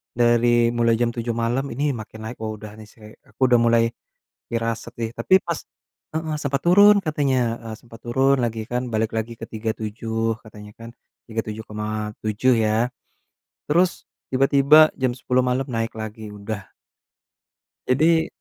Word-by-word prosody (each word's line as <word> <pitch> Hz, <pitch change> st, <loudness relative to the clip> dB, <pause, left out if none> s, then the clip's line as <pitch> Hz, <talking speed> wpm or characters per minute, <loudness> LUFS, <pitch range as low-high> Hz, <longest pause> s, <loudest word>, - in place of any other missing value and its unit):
dari 120 Hz, 0 st, +3 dB
mulai 115 Hz, -1 st, +2 dB
jam 120 Hz, +1 st, +1 dB
7.00 115 Hz, 0 st, -3 dB
malem 120 Hz, +4 st, 0 dB
ini 145 Hz, +3 st, +1 dB
makin 110 Hz, -3 st, -8 dB
naik, 110 Hz, +3 st, -6 dB
wah, 110 Hz, -, -3 dB
udah 105 Hz, 0 st, -10 dB
nih 110 Hz, -, -11 dB
sih, 110 Hz, -, -20 dB, 0.3 s
aku 110 Hz, -, -26 dB
udah 120 Hz, -, +6 dB
mulai 115 Hz, 0 st, +4 dB, 0.7 s
firasat 115 Hz, 0 st, -3 dB
nih. 115 Hz, -1 st, -2 dB
Tapi 185 Hz, -, +3 dB
pas 170 Hz, -2 st, -2 dB, 0.6 s
heeh, 160 Hz, -1 st, -2 dB
sempet 140 Hz, -1 st, -1 dB
turun 200 Hz, +4 st, +7 dB
katanya, 145 Hz, -4 st, +1 dB, 0.2 s
eee, 110 Hz, -1 st, -6 dB
sempet 115 Hz, -1 st, -15 dB
turun 135 Hz, +3 st, +3 dB
lagi 115 Hz, -1 st, -2 dB
kan, 125 Hz, +1 st, -1 dB
balik 110 Hz, 0 st, 0 dB
lagi 110 Hz, +1 st, -3 dB
ke 115 Hz, -, -6 dB
37 110 Hz, 0 st, -3 dB
katanya 105 Hz, -1 st, -12 dB
kan, 115 Hz, 0 st, -9 dB, 0.4 s
37,7 110 Hz, +1 st, -2 dB
ya. 110 Hz, +2 st, +1 dB, 0.8 s
Terus 175 Hz, +4 st, +1 dB, 0.2 s
tiba-tiba 140 Hz, +3 st, +6 dB
jam 130 Hz, -1 st, +1 dB
10.00 130 Hz, 0 st, +1 dB
malem 130 Hz, +2 st, 0 dB
naik 115 Hz, -1 st, -2 dB
lagi, 110 Hz, 0 st, -7 dB
udah. 100 Hz, -1 st, -7 dB, 1.2 s
Jadi, 160 Hz, +5 st, +3 dB
115 Hz, 145 wpm, -23 LUFS, 110-130 Hz, 1.2 s, turun